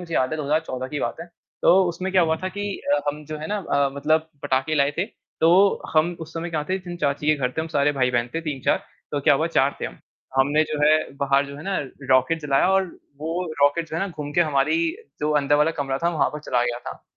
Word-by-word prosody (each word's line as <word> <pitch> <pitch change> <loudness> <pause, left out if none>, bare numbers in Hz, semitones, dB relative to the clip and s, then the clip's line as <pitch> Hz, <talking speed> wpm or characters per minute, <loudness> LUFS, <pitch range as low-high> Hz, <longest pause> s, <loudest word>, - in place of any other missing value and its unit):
मुझे 170 -2 -6
याद 130 0 +2
है 155 - -2
2014 145 -3 -1
की 145 0 -4
बात 120 - -2
है 170 - -7 0.4
तो - - +6
उसमें 185 +3 -3
क्या 185 -2 +5
हुआ 160 -1 +2
था 185 +3 -4
कि 205 +2 -5 0.3
अ, - - 0
हम 150 +1 -3
जो 155 +1 -6
है 155 - -5
ना 210 - -1
अ, 140 -7 +1
मतलब 155 +3 +1
पटाके 135 +2 0
लाए 140 -1 +3
थे। 185 - +2 0.4
तो 185 +5 +5
हम 160 +3 +3
उस 160 0 -8
समय 170 +1 -4
क्या 155 -2 -1
थे 185 +3 -1
जिन 175 -2 -8
चाची 150 -2 -1
के 155 - +5
घर 125 -2 -1
थे - - +1
हम 160 - -3
सारे 145 -2 +2
भाई-बहन 125 -3 +1
थे 165 - 0
3-4, 150 -5 0 0.4
तो - - 0
क्या - - +5
हुआ - - +1
4 - - +1
थे - - -2
हम। - - -10 0.4
हमने 145 +3 +4
जो 155 -1 -4
है 150 - +6 0.2
बाहर 140 0 +2
जो 140 0 -9
है 145 - -9
ना 195 +2 -2 0.3
रॉकेट 130 +6 +3
जलाया 140 +4 +2
और 190 0 +3 0.3
वो 165 +4 -2 0.2
रॉकेट 160 +4 +3
जो 160 - -4
है - - -1
ना 200 - -2
घूम 150 -4 -6
के 175 - +3
हमारी 155 - +2 0.4
जो 150 +1 0
अंदर 140 +1 +2
वाला 150 +2 +3
कमरा 135 -1 -1
था 170 - +3
वहाँ 150 -5 +1
पर 150 - -7
चला 125 -4 0
गया 120 0 -2
था। - - -9
150 Hz, 255 wpm, -23 LUFS, 140-165 Hz, 0.4 s, तो